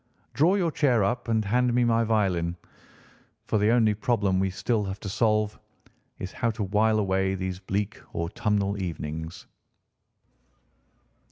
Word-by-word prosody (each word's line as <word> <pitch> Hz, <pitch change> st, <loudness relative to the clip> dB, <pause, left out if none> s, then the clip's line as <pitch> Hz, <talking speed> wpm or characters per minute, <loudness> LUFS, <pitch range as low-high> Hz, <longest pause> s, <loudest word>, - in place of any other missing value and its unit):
Draw 160 Hz, -, +4 dB
your 175 Hz, -5 st, +1 dB
chair 125 Hz, -8 st, +2 dB
up 120 Hz, +5 st, -1 dB
and 110 Hz, -2 st, +1 dB
hand 125 Hz, +3 st, +2 dB
me 125 Hz, -, +4 dB
my 115 Hz, -1 st, +3 dB
violin, 95 Hz, -6 st, +1 dB, 0.9 s
for 110 Hz, -, +1 dB
the 105 Hz, +1 st, +3 dB
only 115 Hz, -2 st, +4 dB
problem 105 Hz, -4 st, +1 dB
we 95 Hz, -, +2 dB
have 95 Hz, -, -10 dB
still 105 Hz, -5 st, 0 dB
to 100 Hz, 0 st, -7 dB
solve 105 Hz, 0 st, +1 dB, 0.6 s
is 95 Hz, -, -6 dB
how 115 Hz, -, -1 dB
to 110 Hz, -1 st, -3 dB
while 110 Hz, +3 st, +2 dB
away 95 Hz, -2 st, +1 dB
these 95 Hz, -1 st, -4 dB
bleak 95 Hz, +1 st, -3 dB
autumnal 100 Hz, +2 st, -1 dB
evenings." 80 Hz, 0 st, -5 dB
105 Hz, 145 wpm, -26 LUFS, 95-115 Hz, 0.9 s, Draw